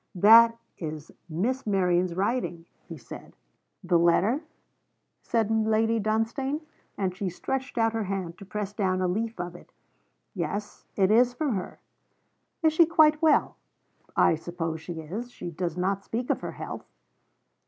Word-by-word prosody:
'That 230 +5 +7 0.2
is 155 -2 -6 0.2
Miss 225 +11 -1
Merion's 180 -3 +1
writing,' 195 -4 -1 0.2
he 165 -2 -8
said. 115 - -11 0.5
'The 175 -1 +3
letter?' 190 - +3 0.8
said 225 -2 0
Lady 220 +1 +2
Dunstane, 225 +7 -1 0.4
and 185 -2 -1
she 195 -1 -2
stretched 265 +9 -4
out 225 -1 +2
her 225 -2 -1
hand 185 -3 -3
to - - -9
press 205 0 -5
down 190 -3 0
a 185 - +1
leaf 220 +3 -2
of 175 0 -4
it. - - -14 0.6
'Yes; 205 0 -4
it 190 0 +3
is 245 +2 +4
from 290 -2 0
her.' 190 -3 -5 0.9
'Is 315 -1 +4
she 330 0 +5
quite 310 -2 +4
well?' 320 -1 +3 0.6
'I - - +5
suppose 165 -1 -4
she 165 -1 -6
is. 205 +11 -6
She 175 - -7
does 170 +1 -3
not 195 +2 -1
speak 240 +2 -2
of - - -1
her - - -5
health.' - - -7
205 Hz, 155 wpm, -27 LUFS, 175-230 Hz, 0.9 s, That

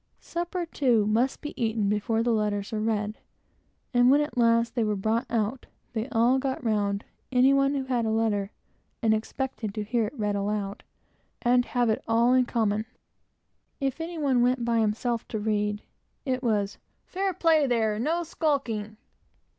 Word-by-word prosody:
Supper, 345 +1 -3
too, 245 -9 +2
must 230 +5 +1
be 295 - -6
eaten 220 -2 0
before 210 +2 0
the 240 - +1
letters 205 -2 -1
were 220 - -2
read; 215 -1 -1 0.7
and 245 0 +5
when, 280 +2 +6
at 295 - -3
last, 230 -1 +3
they 235 - +1
were 210 -1 0
brought 220 +4 0
out, 230 +2 -1 0.3
they 225 +3 -3
all 245 +3 +3
got 265 -1 -3
round 205 -2 0 0.3
any 260 +2 +5
one 275 +1 +3
who 275 - -1
had 250 -3 0
a 220 - 0
letter, 220 -3 0 0.5
and 220 -1 +4
expected 220 -1 -3
to 215 - -2
have 230 +1 0
it 235 +7 -7
read 210 -2 0
aloud, 200 0 -2 0.6
and 245 0 +4
have 245 -2 0
it 220 - -2
all 230 +2 +4
in 255 -1 +3
common. 220 -2 0 0.9
If 275 +2 -2
any 335 +1 -5
one 270 -5 +2
went 250 0 +2
by 230 -1 +2
himself 225 +2 -1
to 220 - -3
read, 210 0 -1 0.4
it 255 -2 -1
was 210 -5 0 0.3
"Fair 385 +1 -1
play, 320 -5 +3
there; 225 -3 +1
and 215 +2 -3
no 335 +4 0
skulking!" 250 -10 -2
230 Hz, 175 wpm, -27 LUFS, 215-260 Hz, 0.9 s, when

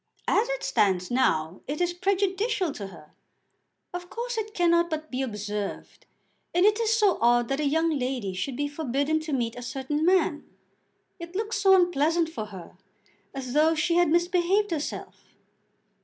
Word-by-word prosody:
"As 460 +4 +2
it - - -3
stands 185 -1 +1
now 170 -9 +1
it 290 +2 -3
is 350 0 +1
prejudicial 385 +1 0
to 205 -7 -7
her. 160 -5 -14 0.8
Of 355 0 -6
course 485 +3 -4
it 430 -1 -4
cannot 340 -1 +3
but 315 -1 -4
be 255 +1 -2
observed, 210 -4 -5 0.5
and 355 +2 +4
it 420 +1 +4
is 450 -1 +1
so 425 -4 +3
odd 240 0 +3
that 275 +1 -1
a 300 - +1
young 320 +3 +2
lady 250 -7 -2
should 245 +8 -3
be 290 0 0
forbidden 285 +1 -1
to 310 0 -6
meet 240 -4 -1
a 245 - -7
certain 270 +4 -3
man. 350 -4 +2 0.8
It 340 +1 -9
looks 425 +1 -2
so 385 -1 +7
unpleasant 335 -2 +2
for 270 -10 -5
her, 190 -3 -12 0.6
as 255 -2 -5
though 315 +2 +4
she 310 +2 +1
had 350 -2 +4
misbehaved 355 +4 +2
herself." 310 -3 -5
315 Hz, 170 wpm, -26 LUFS, 250-365 Hz, 0.8 s, so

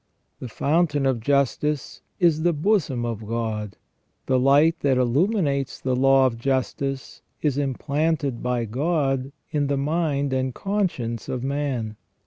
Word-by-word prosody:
The 125 - -6
fountain 145 +3 +1
of 130 -3 +1
justice 140 +3 0 0.2
is 165 -3 +3
the 175 +1 +2
bosom 150 - +1
of 115 -2 -4
God. 110 -3 -3 0.5
The 130 -1 +2
light 145 +6 +4
that 135 -2 +2
illuminates 140 - +1
the 130 -1 -1
law 135 +1 +5
of 115 -3 -1
justice 135 +1 -2 0.2
is 145 -2 +1
implanted 145 0 -1
by 125 -1 -1
God 135 +1 0 0.2
in 145 -2 0
the 140 0 0
mind 145 -2 0
and 130 -1 -1
conscience 170 - -2
of 125 -1 -3
man. 135 -6 -2
135 Hz, 135 wpm, -24 LUFS, 125-150 Hz, 0.5 s, law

